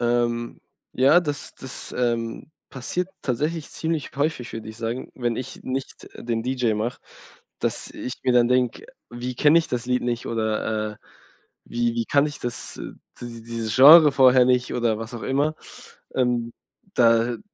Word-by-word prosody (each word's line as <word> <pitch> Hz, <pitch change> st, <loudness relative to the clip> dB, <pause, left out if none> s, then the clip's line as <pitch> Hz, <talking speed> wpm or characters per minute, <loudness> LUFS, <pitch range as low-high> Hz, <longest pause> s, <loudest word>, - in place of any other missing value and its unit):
Ähm. 120 Hz, 0 st, 0 dB, 0.4 s
Ja, 135 Hz, +6 st, +6 dB
das 145 Hz, -4 st, -5 dB
das, 130 Hz, -, -10 dB
ähm, 115 Hz, +1 st, -2 dB, 0.2 s
passiert 135 Hz, +8 st, -3 dB
tatsächlich 150 Hz, +5 st, -2 dB
ziemlich 160 Hz, -2 st, -3 dB
häufig, 140 Hz, -4 st, -1 dB
würd 110 Hz, -1 st, -7 dB
ich 110 Hz, 0 st, -9 dB
sagen, 115 Hz, +2 st, -4 dB
wenn 120 Hz, -2 st, -1 dB
ich 130 Hz, +1 st, -6 dB
nicht 130 Hz, +1 st, -5 dB
den 115 Hz, -1 st, -3 dB
DJ 125 Hz, -3 st, 0 dB
mach, 110 Hz, +4 st, -3 dB, 0.6 s
dass -, -, -3 dB
ich 125 Hz, -, -6 dB
mir 125 Hz, -, +3 dB
dann 120 Hz, -1 st, +5 dB
denk: 125 Hz, -, +1 dB, 0.3 s
„Wie 125 Hz, +1 st, -5 dB
kenn 150 Hz, +5 st, +5 dB
ich 165 Hz, -, +3 dB
das 120 Hz, -1 st, -3 dB
Lied 125 Hz, 0 st, +1 dB
nicht“ 120 Hz, -1 st, -2 dB
oder, 110 Hz, -1 st, -1 dB
äh, -, -, -14 dB, 0.7 s
„Wie 120 Hz, 0 st, -1 dB
wie 115 Hz, -1 st, -1 dB
kann 145 Hz, +1 st, +3 dB
ich 150 Hz, -, -7 dB
das 120 Hz, -1 st, -6 dB, 0.4 s
dies 115 Hz, -2 st, -8 dB
dieses 115 Hz, -2 st, -4 dB
Genre 150 Hz, +2 st, +9 dB
vorher 130 Hz, -1 st, +6 dB
nicht“, 125 Hz, 0 st, +2 dB
oder 115 Hz, -2 st, +1 dB
was 115 Hz, +2 st, -7 dB
auch 115 Hz, -, -7 dB
immer. 145 Hz, +4 st, 0 dB, 0.6 s
Ähm. 120 Hz, -2 st, 0 dB, 0.4 s
Da 115 Hz, 0 st, +3 dB
125 Hz, 160 wpm, -24 LUFS, 115-135 Hz, 0.7 s, Genre